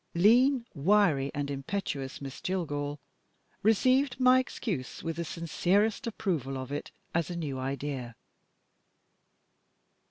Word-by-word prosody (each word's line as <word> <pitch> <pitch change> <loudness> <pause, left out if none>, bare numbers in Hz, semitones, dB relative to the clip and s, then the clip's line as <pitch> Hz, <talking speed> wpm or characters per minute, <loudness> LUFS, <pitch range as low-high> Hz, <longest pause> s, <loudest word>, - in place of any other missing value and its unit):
Lean, 240 +7 +5
wiry, 160 -4 +3
and 145 0 -2
impetuous, 140 -2 -4
Miss 135 -1 -7
Jillgall 145 -6 -2 0.6
received 255 +6 +3
my 255 0 +6
excuse 195 - -4
with 165 -1 -3
the 170 - -1
sincerest 190 - 0
approval 160 - -2
of 130 0 -6
it, 145 - -4 0.2
as 165 -2 0
a 175 - -4
new 145 -6 -3
idea. 135 -2 -4
170 Hz, 115 wpm, -30 LUFS, 140-210 Hz, 0.6 s, my